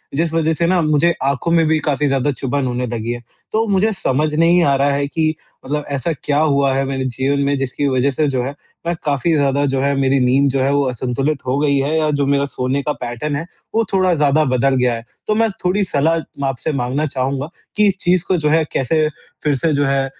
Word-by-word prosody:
जिस 165 Hz, +2 st, 0 dB
वजह 160 Hz, 0 st, +1 dB
से 170 Hz, -, 0 dB
ना 180 Hz, -1 st, +2 dB
मुझे 155 Hz, +2 st, +3 dB
आँखों 140 Hz, +5 st, 0 dB
में 165 Hz, -1 st, +4 dB
भी 160 Hz, -, +3 dB
काफ़ी 145 Hz, -1 st, 0 dB
ज़्यादा 135 Hz, +1 st, +1 dB
चुभन 135 Hz, 0 st, -2 dB
होने 125 Hz, 0 st, -2 dB
लगी 115 Hz, 0 st, -3 dB
है। 120 Hz, 0 st, -5 dB, 0.3 s
तो 220 Hz, +1 st, +1 dB
मुझे 205 Hz, +2 st, +2 dB
समझ 150 Hz, -3 st, 0 dB
नहीं 170 Hz, +2 st, +4 dB
आ 140 Hz, -3 st, +3 dB
रहा 140 Hz, +1 st, +2 dB
है 140 Hz, 0 st, 0 dB
कि 155 Hz, +1 st, 0 dB, 0.3 s
मतलब 150 Hz, +2 st, -2 dB
ऐसा 140 Hz, +4 st, -1 dB
क्या 145 Hz, -, 0 dB
हुआ 140 Hz, -3 st, +2 dB
है 135 Hz, -, +1 dB
मेरे 135 Hz, -1 st, -2 dB
जीवन 130 Hz, +3 st, -1 dB
में, 140 Hz, 0 st, +1 dB
जिसकी 135 Hz, +2 st, -2 dB
वजह 130 Hz, +1 st, +1 dB
से 150 Hz, +3 st, 0 dB
जो 130 Hz, -3 st, -1 dB
है, 135 Hz, +3 st, -5 dB, 0.3 s
मैं 170 Hz, -, 0 dB
काफ़ी 145 Hz, +3 st, +1 dB
ज़्यादा 140 Hz, 0 st, +2 dB
जो 135 Hz, -1 st, 0 dB
है, 140 Hz, 0 st, +1 dB
मेरी 135 Hz, 0 st, +2 dB
नींद 130 Hz, +2 st, +3 dB
जो 135 Hz, 0 st, 0 dB
है, 135 Hz, +1 st, +2 dB
वो 145 Hz, 0 st, +2 dB
असंतुलित 130 Hz, +4 st, -2 dB
हो 130 Hz, +2 st, +1 dB
गई 140 Hz, -2 st, +2 dB
है? 145 Hz, +4 st, 0 dB
या 155 Hz, -1 st, +1 dB
जो 145 Hz, -1 st, 0 dB
मेरा 140 Hz, 0 st, +2 dB
सोने 130 Hz, +1 st, -2 dB
का 150 Hz, -, -1 dB
पैटर्न 125 Hz, +5 st, -3 dB
है, 160 Hz, +4 st, -3 dB, 0.3 s
वो 225 Hz, -, +3 dB
थोड़ा 185 Hz, -2 st, +3 dB
ज़्यादा 150 Hz, 0 st, +3 dB
बदल 135 Hz, +2 st, +2 dB
गया 125 Hz, -1 st, +2 dB
है? 115 Hz, -, -8 dB, 0.2 s
तो 215 Hz, -, +1 dB
मैं 225 Hz, 0 st, +2 dB, 0.2 s
थोड़ी 195 Hz, +3 st, +2 dB
सलाह 160 Hz, +4 st, +2 dB, 0.3 s
आपसे 135 Hz, +4 st, -2 dB
माँगना 135 Hz, +3 st, -1 dB
चाहूँगा 135 Hz, +1 st, -2 dB, 0.3 s
कि 210 Hz, -1 st, +4 dB
इस 195 Hz, -1 st, +1 dB
चीज़ 175 Hz, -1 st, +2 dB
को 185 Hz, -, +2 dB
जो 150 Hz, -2 st, +1 dB
है, 160 Hz, +1 st, +3 dB
कैसे 155 Hz, +4 st, +1 dB, 0.4 s
फिर 150 Hz, -2 st, +2 dB
से 155 Hz, +4 st, 0 dB
जो 145 Hz, 0 st, +1 dB
है 135 Hz, 0 st, +1 dB
140 Hz, 240 wpm, -18 LUFS, 135-155 Hz, 0.4 s, में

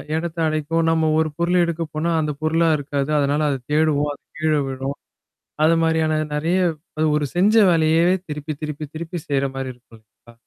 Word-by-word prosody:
எடத்த 170 Hz, +1 st, -3 dB
அடைக்கும். 155 Hz, +1 st, 0 dB
நம்ம 160 Hz, -1 st, +2 dB
ஒரு 160 Hz, -1 st, +1 dB
பொருள் 175 Hz, +1 st, +2 dB
எடுக்க 170 Hz, 0 st, -2 dB
போனா, 160 Hz, +2 st, -1 dB
அந்த 150 Hz, -1 st, -1 dB
பொருளா 165 Hz, +1 st, +2 dB
இருக்காது. 145 Hz, 0 st, -3 dB
அதனால 145 Hz, +1 st, +1 dB
அத 140 Hz, -, 0 dB, 0.2 s
தேடுவோம். 150 Hz, -1 st, +2 dB
அது -, -, -16 dB, 0.2 s
கீழ 155 Hz, 0 st, +1 dB
விழும். 135 Hz, +1 st, -4 dB, 0.7 s
அது 165 Hz, -, +5 dB
மாரியான 160 Hz, -1 st, +1 dB, 0.2 s
நறைய 165 Hz, +5 st, +1 dB, 0.4 s
அது 155 Hz, -, +2 dB
ஒரு 150 Hz, -, 0 dB
செஞ்ச 200 Hz, +5 st, +4 dB, 0.2 s
வேலையவே 165 Hz, +2 st, +3 dB
திருப்பி 150 Hz, +1 st, -4 dB
திருப்பி 150 Hz, 0 st, -4 dB
திருப்பி 170 Hz, +2 st, -5 dB
செய்ற 140 Hz, -1 st, +1 dB
மாரி 135 Hz, -1 st, -4 dB
இருக்கும் 120 Hz, -2 st, -19 dB
இல்ல்லங்களா? 110 Hz, +2 st, -21 dB
155 Hz, 170 wpm, -21 LUFS, 145-165 Hz, 0.7 s, அது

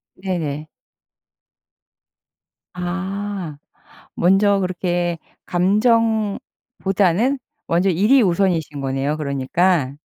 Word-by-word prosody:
네네. 160 Hz, -6 st, -3 dB, 2.1 s
아. 190 Hz, -1 st, -4 dB, 0.6 s
먼저 195 Hz, +3 st, +3 dB
그렇게 175 Hz, -2 st, -1 dB, 0.3 s
감정보다는 215 Hz, +2 st, +1 dB, 0.3 s
먼저 175 Hz, +3 st, +2 dB
일이 210 Hz, +10 st, +4 dB
우선이신 170 Hz, -7 st, 0 dB
거네요 135 Hz, +2 st, -1 dB
그러니까. 140 Hz, +1 st, 0 dB
185 Hz, 165 characters per minute, -20 LUFS, 165-200 Hz, 2.1 s, 일이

